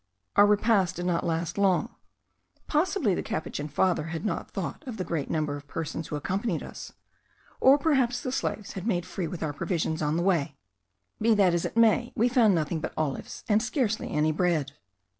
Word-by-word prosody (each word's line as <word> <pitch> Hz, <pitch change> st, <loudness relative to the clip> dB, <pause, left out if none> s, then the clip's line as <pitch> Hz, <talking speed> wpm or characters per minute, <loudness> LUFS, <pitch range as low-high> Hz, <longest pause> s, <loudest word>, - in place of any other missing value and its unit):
Our 205 Hz, -, +7 dB
repast 205 Hz, -3 st, +3 dB
did 175 Hz, -, -4 dB
not 175 Hz, -2 st, 0 dB
last 165 Hz, +3 st, -2 dB
long. 190 Hz, -3 st, +2 dB, 0.7 s
Possibly 305 Hz, -, +1 dB
the -, -, -1 dB
Capuchin 150 Hz, -1 st, -4 dB
father 160 Hz, +1 st, +1 dB
had 165 Hz, +4 st, -5 dB
not -, -, -2 dB
thought -, -, -5 dB
of 235 Hz, -3 st, -5 dB
the 185 Hz, -, -2 dB
great 160 Hz, -6 st, -3 dB
number 155 Hz, -2 st, -1 dB
of 145 Hz, 0 st, -10 dB
persons 160 Hz, +1 st, -4 dB
who -, -, -4 dB
accompanied 190 Hz, +4 st, -2 dB
us, -, -, -9 dB, 0.7 s
or 270 Hz, +2 st, +7 dB
perhaps 265 Hz, -5 st, +2 dB
the 255 Hz, -, -4 dB
slaves 215 Hz, -5 st, -3 dB
had 190 Hz, +2 st, -5 dB
made 180 Hz, -6 st, 0 dB
free 180 Hz, -1 st, -4 dB
with 165 Hz, +1 st, -5 dB
our 150 Hz, -2 st, -2 dB
provisions 165 Hz, 0 st, -2 dB
on 150 Hz, +1 st, +1 dB
the 170 Hz, -, 0 dB
way; 160 Hz, -7 st, +1 dB, 0.6 s
be 225 Hz, 0 st, +4 dB
that 190 Hz, -4 st, +4 dB
as 175 Hz, -, 0 dB
it -, -, -4 dB
may, 230 Hz, +1 st, +4 dB
we 235 Hz, +3 st, +3 dB
found 230 Hz, -6 st, +4 dB
nothing 160 Hz, 0 st, -1 dB
but -, -, -5 dB
olives, 150 Hz, -4 st, -3 dB
and 215 Hz, -1 st, +3 dB
scarcely 240 Hz, -3 st, -1 dB
any 155 Hz, +1 st, +1 dB
bread. 155 Hz, -4 st, 0 dB
180 Hz, 195 wpm, -27 LUFS, 160-220 Hz, 0.7 s, Our